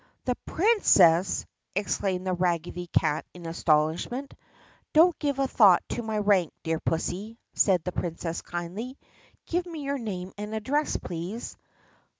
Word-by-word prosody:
"The 250 - +2
Princess!" 195 - +4 0.3
exclaimed 190 -2 -1
the 185 - 0
raggedy 175 0 -1
cat 155 -2 +1
in 175 -1 -10
astonishment. 165 - 0 0.6
"Don't 330 +2 +6
give 285 -2 -1
a 275 -1 +1
thought 200 -8 +6
to - - -2
my 220 -2 -3
rank, 200 -5 +3
dear 160 0 -1
pussy," 190 +7 -3 0.2
said 185 -5 +3
the 180 - -3
Princess 170 -1 -3
kindly. 185 +10 -6 0.5
"Give 350 +1 -1
me 320 -4 -6
your 280 0 -2
name 190 -5 -5
and 210 +1 -4
address, 285 +8 0
please." 180 +7 -6
195 Hz, 140 wpm, -27 LUFS, 175-255 Hz, 0.6 s, Don't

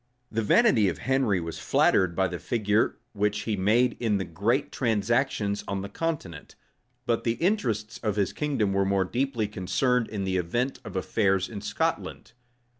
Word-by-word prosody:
The 115 - 0
vanity 110 - +4
of - - -4
Henry 130 -8 +1
was 85 -1 -5
flattered 90 -3 +2
by 95 +1 +2
the 90 -1 -5
figure 105 -2 +1 0.2
which 105 0 0
he 110 - -1
made 115 +6 +2
in 110 -4 +1
the 95 - -2
great 115 - 0
transactions 110 -2 0
on 100 -1 -3
the 100 - -6
continent; 120 - -4 0.5
but 115 -1 0
the 115 - +1
interests 115 - -1
of 105 -4 -1
his 100 -2 0
kingdom 130 -10 0
were 100 0 +2
more 95 -1 +1
deeply 120 +1 -1
concerned 115 +5 0
in 100 -3 -3
the 95 -1 0
event 120 +10 -1
of - - -9
affairs 95 0 +1
in 105 -3 -7
Scotland. 160 +11 -2
105 Hz, 170 wpm, -27 LUFS, 95-125 Hz, 0.5 s, vanity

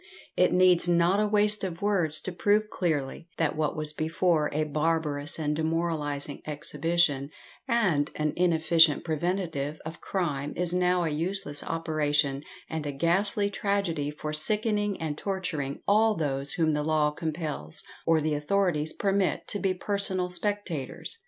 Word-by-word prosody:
It 180 - +3
needs 180 -1 +4
not 175 +3 +3
a 210 - +2
waste 210 0 +4
of 175 -3 -4
words 175 -7 +1
to 185 - -5
prove 210 +4 +1
clearly, 160 -2 -2
that 160 -3 0
what 155 0 -1
was 155 0 0
before 160 0 +1
a 155 +1 0
barbarous 150 -1 0
and 150 -2 -1
demoralising 155 -3 -2
exhibition, 150 -1 0 0.4
and 190 - +1
an 150 0 -1
inefficient 165 -3 +4
preventative 160 -3 -2
of 160 +2 -8
crime, 150 -7 -2
is 175 0 -1
now 180 0 +2
a 165 - 0
useless 155 -1 -3
operation 150 -4 0 0.3
and 160 -2 -4
a - - -2
ghastly 195 +7 +1
tragedy 195 -8 -1
for 150 +1 -6
sickening 210 +4 +1
and 155 -2 -4
torturing 160 -8 -3
all 215 +2 +4
those 140 -3 +1
whom 160 -2 +1
the 150 - 0
law 150 -1 +1
compels 155 - -5 0.2
or 165 -1 +2
the 155 0 0
authorities 155 0 0
permit 195 -1 0
to 205 - +1
be 190 -2 0
personal 190 -2 +1
spectators. 200 - -2
165 Hz, 145 wpm, -27 LUFS, 150-185 Hz, 0.4 s, needs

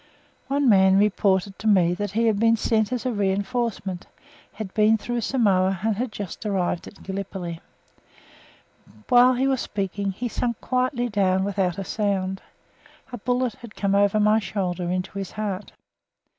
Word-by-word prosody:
One 280 0 +1
man 190 -3 +5
reported 195 -1 +1
to 220 - -3
me 180 -5 +4
that 205 +2 -4
he 230 +2 +2
had 215 -3 +2
been 230 +1 +4
sent 220 0 +1
as 250 -2 -3
a 255 - +1
reinforcement, 200 -1 -2 0.5
had 205 -4 -7
been 215 0 +4
through 240 +2 -3
Samoa, 195 -7 +2
and 220 -1 +1
had 240 +2 -3
just 200 -4 -7
arrived 190 -4 -1
in - - -12
Gallipoli. 190 -3 -5 1.5
While 250 +1 +6
he 260 +2 +1
was 265 -2 +1
speaking, 200 0 -3
he 245 +6 -4
sank 235 0 -2
quietly 250 -1 0
down 190 -3 +1
without 190 -2 -1
a 195 - -3
sound. 190 -2 -2 0.7
A 245 - -6
bullet 245 +1 0
had 235 -3 -13
come 200 -1 0
over 200 +1 +3
my 210 +1 +4
shoulder 180 -4 -3
into 185 +2 -3
his 195 - -6
heart. 210 -2 -4
205 Hz, 160 wpm, -24 LUFS, 190-230 Hz, 1.5 s, While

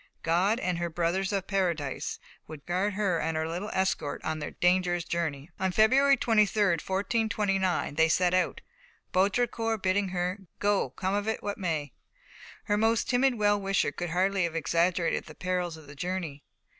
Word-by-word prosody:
God 185 +8 +2
and 180 -7 -1
"her 170 0 -1
brothers 175 +4 0
of 195 -2 -1
Paradise" 170 -8 -1 0.3
would 155 -2 -10
guard 185 +4 0
her 195 -5 +1
and 160 0 -1
her 160 0 -1
little 180 +6 -4
escort 190 -6 -1
on 160 0 -2
their 150 - -4
dangerous 175 -1 +1
journey. 160 -3 -3
On 190 0 +1
February 265 +8 +5
23, 215 -3 +2
1429, 195 -1 0
they 160 +2 +3
set 180 +2 +2
out, 185 0 +1 0.5
Baudricourt 225 +2 +1
bidding 190 +1 +2
her 180 +2 -2 0.2
"Go, 205 -8 +1
come 185 +9 -3
of 205 +1 -1
it 220 - -2
what 205 0 -3
may." 160 -6 -2 0.7
Her 205 -1 0
most 225 +3 +2
timid 255 +1 +3
well 205 -2 +2
wisher 195 -6 +1
could 175 +3 -4
hardly 185 +2 +1
have 165 -1 -4
exaggerated 170 +1 +1
the - - -12
perils 180 -2 -2
of 160 - -14
the 145 - -11
journey. 170 -2 -4
185 Hz, 170 wpm, -28 LUFS, 170-205 Hz, 0.7 s, February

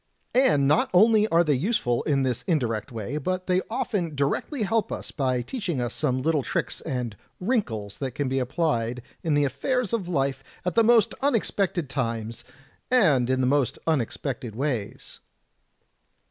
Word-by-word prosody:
And 245 - +4
not 150 +2 +3
only 215 +2 +6
are 170 -3 +4
they 150 -3 +2
useful 135 - 0
in 140 -3 +1
this 125 -3 -1
indirect 120 - 0
way, 115 +5 -4
but 185 +4 -2
they 185 0 +2
often 205 - -2
directly 140 - -1
help 225 +2 0
us - - -5
by 130 -4 0
teaching 185 - -3
us 120 -1 -2
some 130 -4 -1
little 160 -1 +2
tricks - - -2
and 125 -7 -3
* - - -44
wrinkles' 130 - -2
that 130 -3 -4
can 145 - -1
be 135 +1 0
applied 125 -4 -1 0.2
in 155 -3 +1
the 145 0 +3
affairs 225 - -1
of 210 -6 -1
life 135 -5 -1 0.2
at 180 - 0
the 230 - +4
most 225 -2 +4
unexpected 200 - 0
times, 115 -4 -3 0.5
and 155 - +4
in 130 0 +2
the - - +2
most 140 -1 +1
imex 150 -8 0
pected 125 -5 -5
ways." 125 -6 -3
145 Hz, 170 wpm, -25 LUFS, 125-185 Hz, 0.5 s, only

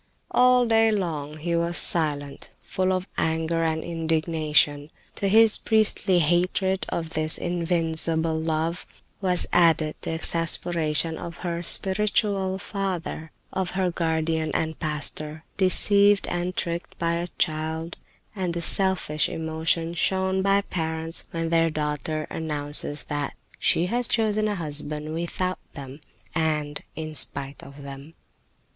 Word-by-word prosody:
All 250 0 +5
day 225 -1 +4
long 155 -7 -3
he 170 +2 -2
was 170 +1 +1
silent, 145 -4 +1
full 185 0 -1
of 185 +1 -1
anger 160 +1 0
and 160 -1 -1
indignation. 155 -3 +1 0.3
To 200 - 0
his 220 +2 +5
priestly 215 -4 +2
hatred 180 +3 +1
of 165 -1 -4
this 155 0 0
invincible 165 -2 +1
love 160 +2 -2 0.3
was 180 -2 +4
added 165 -3 +4
the - - -3
exasperation 165 -1 +1
of 170 -1 -7
her 170 -1 -2
spiritual 195 +1 +2
father, 190 -5 -4 0.2
of 190 -1 -2
her 185 -2 +1
guardian 160 -1 -1
and 160 -1 -2
pastor, 155 0 -1
deceived 200 +1 +4
and 175 +1 -2
tricked 170 0 -3
by 170 -1 0
a 170 +1 -3
child, 160 +1 -2 0.4
and 180 -3 -2
the 170 - -2
selfish 185 -4 +2
emotion 160 +1 -1
shown 190 +2 0
by 195 +1 +3
parents 160 -3 -2
when 165 -1 -3
their 165 0 +3
daughter 155 0 -3
announces 145 -1 -2
that 145 -1 -4 0.2
she 170 - +3
has 240 +5 -1
chosen 215 -2 +1
a 210 - -1
husband 150 -2 -4
without 175 +2 -3 0.2
them, 140 +1 -9 0.3
and 150 -3 -1
in 155 0 -6
spite 140 -1 -2
of 140 +1 -12
them. 140 +3 -10
165 Hz, 130 wpm, -25 LUFS, 155-185 Hz, 0.4 s, All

